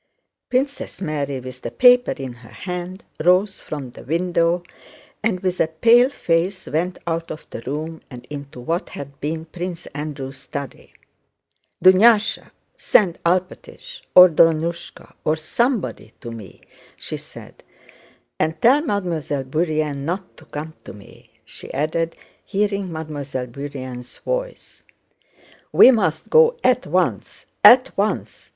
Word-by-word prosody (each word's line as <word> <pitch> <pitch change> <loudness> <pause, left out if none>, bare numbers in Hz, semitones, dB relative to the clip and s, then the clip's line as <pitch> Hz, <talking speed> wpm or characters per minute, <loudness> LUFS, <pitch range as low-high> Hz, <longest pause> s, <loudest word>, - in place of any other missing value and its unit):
Princess 275 +3 -2
Mary, 145 -6 -3
with 130 0 -10
the - - -4
paper 250 0 +5
in 130 -2 -7
her 120 -1 -16
hand, 180 +1 -6 0.2
rose 185 +3 +3
from 140 -5 -7
the - - -12
window 170 +3 +1 0.6
and 210 -4 0
with 185 -1 -1
a - - +3
pale 235 +10 +5
face 185 -5 -1
went 175 +4 -2
out 165 0 -2
of 155 - -8
the - - -6
room 155 +4 -4
and 125 -2 -11
into 140 -3 -8
what 165 +8 -2
had 140 0 -9
been 160 +2 -3
Prince 175 +1 -6
Andrew's 140 -2 -6
study. 135 +1 -8 0.9
"Dunyásha, 210 +4 +5 0.3
send 185 -6 +2
Alpátych, 185 - -2
or 180 0 +11
Drónushka, 165 +1 0
or 155 - +2
somebody 160 - -2
to 120 - -8
me!" 110 -4 -11 0.4
she - - -5
said, - - -13 0.8
"and 160 +1 0
tell 265 - +5
Mademoiselle 170 - -2
Bourienne 155 0 -1
not 180 +5 -4
to 160 - -16
come 155 +1 -7
to - - -10
me," 100 0 -16 0.2
she - - -10
added, 160 +3 -1 0.3
hearing 200 -2 -1
Mademoiselle 145 -5 -5
Bourienne's 130 -1 -8
voice. - - -5 0.9
"We 260 - +8
must 230 -4 -1
go 475 0 +5
at - - +2
once, - - -1 0.2
at 255 +2 +8
once!" 205 +2 -2
165 Hz, 130 wpm, -21 LUFS, 145-190 Hz, 0.9 s, or